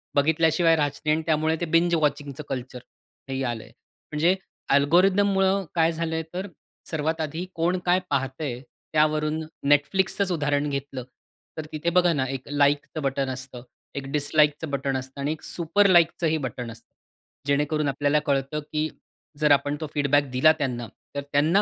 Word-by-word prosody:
बघितल्याशिवाय 160 +3 +3
राहायचं 145 -2 -1
नाही 155 0 +3
आणि 160 - -3
त्यामुळे 160 0 +2
ते - - +1
बिंज 170 0 +4
वॉचिंगचं 145 -2 -1
कल्चर 130 -1 -5 0.5
हेही 135 0 -2
आलंय. 120 -3 -4 0.4
म्हणजे 165 +5 +3 0.4
अल्गोरिथममुळं 190 +5 +3
काय 165 0 +3
झालंय 160 0 -2
तर, 190 +3 -4 0.4
सर्वात 160 0 -1
आधी 160 +4 -3
कोण 170 +3 +1
काय 180 +1 +4
पाहतंय 135 -1 -2 0.3
त्यावरून 155 0 +2 0.3
Netflixचंच 190 +6 +2
उदाहरण 145 -2 0
घेतलं 140 -2 -4 0.5
तर 155 - -4
तिथे 155 +2 -1
बघा 175 -1 +5
ना 135 -3 0
एक 130 -1 -5
लाइकचं 145 +2 +1
बटन 135 -1 -1
असतं, 130 -1 -7 0.3
एक 140 -1 -4
डिस 145 -1 -1
लाइकचं 150 0 +3
बटन 135 -1 -1
असतं 130 +2 -8
आणि 145 +2 0
एक 160 - -5
सुपर 175 +4 +2
लाइकचं 170 -1 +4
ही 160 0 +1
बटन 125 -2 -5
असतं. 115 - -15 0.6
जेणेकरून 150 +1 +1
आपल्याला 145 +2 +2
कळतं 140 +2 0
की 155 0 0 0.5
जर 150 -1 +3
आपण 145 +1 +3
तो 155 - -3
फीडबॅक 145 -1 +2
दिला 135 +5 +5
त्यांना 120 -4 -2 0.3
तर 140 - -1
त्यांना 160 +8 +4
150 Hz, 160 wpm, -25 LUFS, 140-165 Hz, 0.6 s, बघा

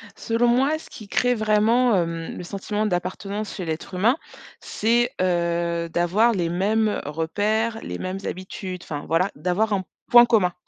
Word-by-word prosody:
Selon 230 +1 0
moi, 265 +6 +3
ce - - -14
qui 215 - -11
crée 245 +4 +2
vraiment, 220 +2 +3
hem, 165 -2 -2
le - - -6
sentiment 205 +3 -3
d'appartenance 200 +2 -3
chez 185 - -5
l'être 160 +3 -5
humain. 220 +10 +2 0.4
C'est, 240 +3 +1
heu, 170 -1 0
d'avoir 190 +8 +2
les 175 -5 -1
mêmes 210 +5 +1
repères, 205 +9 -1
les - - -5
mêmes 185 +1 -4
habitudes, 185 0 -6
enfin 145 -2 -6
voilà. 165 +4 +1
D'avoir 185 +8 0
un 190 -2 0 0.3
point 240 0 +9
commun. 210 -7 +2
200 Hz, 155 wpm, -23 LUFS, 175-220 Hz, 0.4 s, point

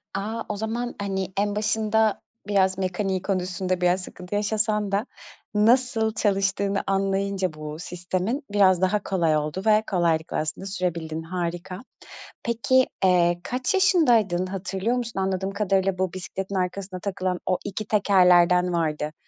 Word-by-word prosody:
A! 215 +4 -3
O 210 - -2
zaman, 235 +3 -3
hani, 190 -1 -3
en 205 0 0
başında 215 0 +1 0.3
biraz 190 -2 +2
mekaniği 190 0 -1
konusunda 185 -1 -2
biraz 180 +1 +2
sıkıntı 180 +1 -7
yaşasan 210 0 +1
da 200 +4 0 0.5
nasıl 225 0 +3
çalıştığını 200 -2 0
anlayınca 195 -2 0
bu 155 0 -7
sistemin 180 - -3
biraz 190 -3 +4
daha 190 +2 +1
kolay 165 -5 +1
oldu 150 +5 -3
ve 215 0 +4
kolaylıkla 165 -3 +1
aslında 155 +5 -3
sürebildin. 170 -4 -3
Harika. 175 +1 -4 0.6
Peki, 245 +3 +2 0.2
eee, 175 -1 +3
kaç 250 0 -1
yaşındaydın? 235 - +3
Hatırlıyor 195 +5 -2
musun? 235 -5 -4
Anladığım 190 0 -1
kadarıyla 195 -2 0
bu 185 -2 -1
bisikletin 190 +1 -5
arkasına 185 0 -3
takılan 185 -1 -2
o 185 - +1
2 205 +1 -4
tekerlerden 180 -3 +4
vardı. 155 -2 -1
190 Hz, 135 wpm, -24 LUFS, 180-210 Hz, 0.6 s, biraz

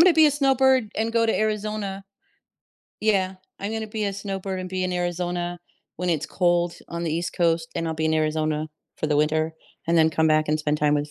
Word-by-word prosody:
gonna 355 +1 +8
be 315 -1 +7
a - - +4
snowbird 265 -5 +3
and 225 +1 0
go 230 -1 +3
to 225 - +2
Arizona. 210 -2 -2 1.0
Yeah, 190 -3 +1 0.2
I'm 200 +2 -3
gonna 220 0 -3
be 215 0 -3
a 200 - -1
snowbird 195 -1 -4
and 185 - -5
be 185 0 -2
in 180 - -1
Arizona 175 0 -2 0.4
when 180 0 -1
it's 160 - 0
cold 175 -1 +1
on 170 0 -4
the 155 - -1
East 170 +2 -2
Coast, 165 -1 +1
and 165 - -2
I'll 160 - -2
be 160 0 -2
in 160 - +2
Arizona 155 0 0 0.3
for 155 - -2
the 150 - +1
winter, 155 +2 +1 0.3
and 170 +1 +2
then 160 0 +5
come 160 0 +2
back 155 0 +3
and 155 - +2
spend 150 0 0
time 150 0 +3
with 145 0 -1
175 Hz, 220 wpm, -24 LUFS, 160-210 Hz, 1.0 s, gonna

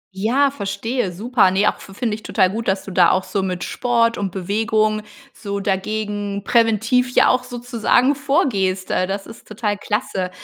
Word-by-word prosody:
Ja, 255 +8 +2
verstehe. 200 -2 -3
Super. 215 +1 +2
Ne, 195 +3 +1
auch - - 0
fi - - -13
finde 225 -2 -1
ich 220 - -5
total 190 -4 +1
gut, 225 +3 -4
dass 190 0 0
du 195 - -7
da 180 -2 +5
auch 190 0 +1
so 200 - -2
mit 180 -2 -3
Sport 230 -2 +1
und 195 -3 -2
Bewegung 215 +3 0 0.3
so 200 -2 -5
dagegen, 205 0 -2
präventiv 230 +2 +2
ja - - +6
auch 255 0 +2
sozusagen 245 +1 +1
vorgehst. 255 - 0
Äh, 185 - +1
das 195 +1 -4
ist 230 - -13
total 210 -1 -2
klasse. 200 -3 -2
210 Hz, 180 wpm, -20 LUFS, 195-235 Hz, 0.3 s, ja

